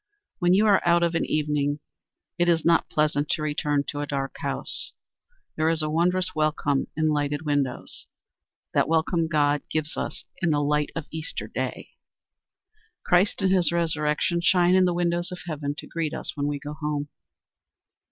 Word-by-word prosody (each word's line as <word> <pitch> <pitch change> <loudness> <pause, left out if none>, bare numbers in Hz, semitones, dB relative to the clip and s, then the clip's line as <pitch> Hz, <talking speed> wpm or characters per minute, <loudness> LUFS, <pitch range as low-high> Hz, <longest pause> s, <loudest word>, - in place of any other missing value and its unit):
When 175 0 +4
you 210 +3 +4
are 205 -3 +5
out 170 0 +4
of 170 0 +1
an 165 - +1
evening 150 -1 0 0.6
it 175 0 +3
is 165 -2 +2
not 170 0 +3
pleasant 150 -1 +1
to 155 - 0
return 145 -1 0
to 145 - -4
a 145 - -3
dark 135 -1 -3
house. - - -2 0.6
There 160 0 +2
is 165 -1 +1
a 155 - -1
wondrous 180 +3 +1
welcome 150 -3 0
in 155 0 +2
lighted 145 0 0
windows. 145 -4 -2 0.7
That - - +3
welcome 165 +1 +1
God 145 -2 +2
gives 155 0 -2
us - - -4 0.2
in 170 - +2
the 145 -1 +2
light 150 0 +1
of 165 -3 -4
Easter 160 0 -5
day. - - -4 1.2
Christ, 190 +3 +3
and 190 - +3
his 180 -3 +3
resurrection, 165 0 0
shine 175 +1 +4
in 185 0 +5
the 180 - +2
windows 175 +1 0
of 180 -2 -7
heaven 145 -3 -3
to - - -7
greet 165 -3 -3
us - - -5
when 145 0 -1
we 145 0 -1
go 145 +1 -7
home. 150 -1 -3
155 Hz, 175 wpm, -25 LUFS, 145-170 Hz, 1.2 s, are